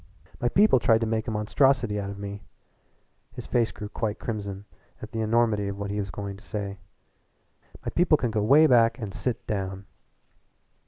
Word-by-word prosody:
"My 120 Hz, -, +1 dB
people 200 Hz, -, +5 dB
tried 115 Hz, -1 st, +3 dB
to -, -, +1 dB
make 110 Hz, +1 st, -1 dB
a -, -, -1 dB
monstrosity 110 Hz, +1 st, +2 dB
out 100 Hz, -1 st, -4 dB
of 100 Hz, -, -7 dB
me." 100 Hz, 0 st, -6 dB, 0.9 s
His -, -, -8 dB
face 120 Hz, -2 st, +1 dB
grew 105 Hz, -, -7 dB
quite 110 Hz, 0 st, -3 dB
crimson 100 Hz, -3 st, -5 dB, 0.3 s
at 110 Hz, -, -9 dB
the 115 Hz, -, -2 dB
enormity 110 Hz, -2 st, +2 dB
of 100 Hz, 0 st, -4 dB
what 100 Hz, 0 st, -4 dB
he 105 Hz, -, -2 dB
was 100 Hz, -1 st, -3 dB
going 100 Hz, +2 st, -6 dB
to 100 Hz, -, -16 dB
say. 100 Hz, -3 st, -5 dB, 1.1 s
"My -, -, -2 dB
people 170 Hz, -3 st, +3 dB
can 120 Hz, -5 st, -1 dB
go 105 Hz, -1 st, 0 dB
way 140 Hz, +9 st, +6 dB
back 115 Hz, -4 st, +4 dB
and 105 Hz, -5 st, -6 dB
sit 125 Hz, -3 st, -3 dB
down!" 95 Hz, -1 st, -3 dB
110 Hz, 190 wpm, -26 LUFS, 100-120 Hz, 1.1 s, way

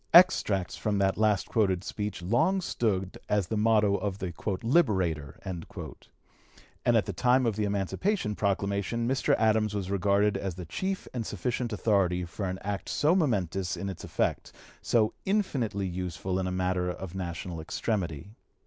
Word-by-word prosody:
Extracts 105 Hz, -, +5 dB
from 105 Hz, -1 st, -1 dB
the 95 Hz, -1 st, +3 dB
last 105 Hz, -3 st, +2 dB
quoted 95 Hz, -5 st, +1 dB
speech 105 Hz, -3 st, -4 dB
long 160 Hz, -, +2 dB
stood 100 Hz, -, -1 dB
as 105 Hz, -2 st, +2 dB
the 110 Hz, -, -1 dB
motto 105 Hz, -2 st, +3 dB
of 100 Hz, -1 st, -3 dB
the 95 Hz, -3 st, -4 dB, 0.3 s
"Liberator;" 95 Hz, -, +1 dB
and 90 Hz, -4 st, -5 dB, 1.3 s
at -, -, +2 dB
the -, -, -4 dB
time 125 Hz, +1 st, +3 dB
of 115 Hz, -3 st, +1 dB
the 105 Hz, 0 st, 0 dB
Emancipation 105 Hz, -, 0 dB
Proclamation 100 Hz, +3 st, 0 dB
Mr. 130 Hz, +1 st, +2 dB
Adams 110 Hz, -1 st, +2 dB
was 95 Hz, -2 st, -3 dB
regarded 100 Hz, +1 st, +2 dB
as 95 Hz, -4 st, -3 dB
the 90 Hz, -1 st, -7 dB
chief 190 Hz, -, -3 dB
and 120 Hz, -2 st, -2 dB
sufficient 120 Hz, +4 st, -2 dB
authority 95 Hz, -4 st, +1 dB
for 95 Hz, +3 st, -4 dB
an 95 Hz, -, -3 dB
act 100 Hz, 0 st, -3 dB
so 150 Hz, +3 st, +3 dB
momentous 95 Hz, -, 0 dB
in 100 Hz, -, -3 dB
its 95 Hz, -, -7 dB
effect, -, -, -1 dB, 0.3 s
so 110 Hz, -2 st, +2 dB
infinitely 130 Hz, -, 0 dB
useful 90 Hz, +1 st, -3 dB
in 95 Hz, -, -1 dB
a -, -, -2 dB
matter 90 Hz, 0 st, 0 dB
of 90 Hz, 0 st, -6 dB
national 85 Hz, -2 st, -4 dB
extremity. 85 Hz, -1 st, -3 dB
100 Hz, 160 wpm, -29 LUFS, 95-115 Hz, 1.3 s, Extracts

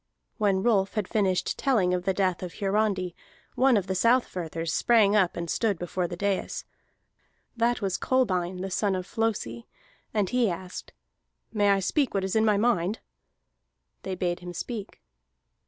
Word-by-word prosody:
When 195 Hz, -3 st, +2 dB
Rolf 200 Hz, -5 st, +2 dB
had 210 Hz, -4 st, -1 dB
finished 190 Hz, -4 st, 0 dB
telling 215 Hz, -10 st, +2 dB
of 180 Hz, 0 st, -2 dB
the 190 Hz, -, +2 dB
death 185 Hz, -3 st, 0 dB
of 180 Hz, -2 st, -6 dB
Hiarandi, 195 Hz, -3 st, 0 dB, 0.4 s
one 260 Hz, -2 st, +4 dB
of 195 Hz, -, 0 dB
the 190 Hz, -, -2 dB
Southfirthers 180 Hz, -7 st, 0 dB
sprang 215 Hz, -4 st, +4 dB
up 190 Hz, -5 st, +2 dB
and 170 Hz, 0 st, -3 dB
stood 205 Hz, +2 st, 0 dB
before 175 Hz, +1 st, -2 dB
the 175 Hz, 0 st, -7 dB
dais. 200 Hz, 0 st, -2 dB, 0.9 s
That 235 Hz, -1 st, +1 dB
was 190 Hz, -2 st, -1 dB
Kolbein 185 Hz, -8 st, 0 dB
the 190 Hz, 0 st, -4 dB
son 200 Hz, +1 st, +1 dB
of 185 Hz, -1 st, -3 dB
Flosi, 190 Hz, -, -2 dB, 0.4 s
and 210 Hz, -3 st, +1 dB
he 250 Hz, -3 st, +2 dB
asked: 180 Hz, +1 st, -6 dB, 0.6 s
"May 205 Hz, -2 st, +3 dB
I 195 Hz, -1 st, +3 dB
speak 265 Hz, -, 0 dB
what 195 Hz, -, +1 dB
is 190 Hz, +1 st, -2 dB
in 220 Hz, 0 st, +4 dB
my 210 Hz, -2 st, +3 dB
mind?" 210 Hz, -2 st, +1 dB, 1.0 s
They 190 Hz, -1 st, -4 dB
bade 175 Hz, -1 st, -1 dB
him 180 Hz, -1 st, -8 dB
speak. 210 Hz, +3 st, -6 dB
195 Hz, 165 wpm, -27 LUFS, 180-220 Hz, 1.0 s, one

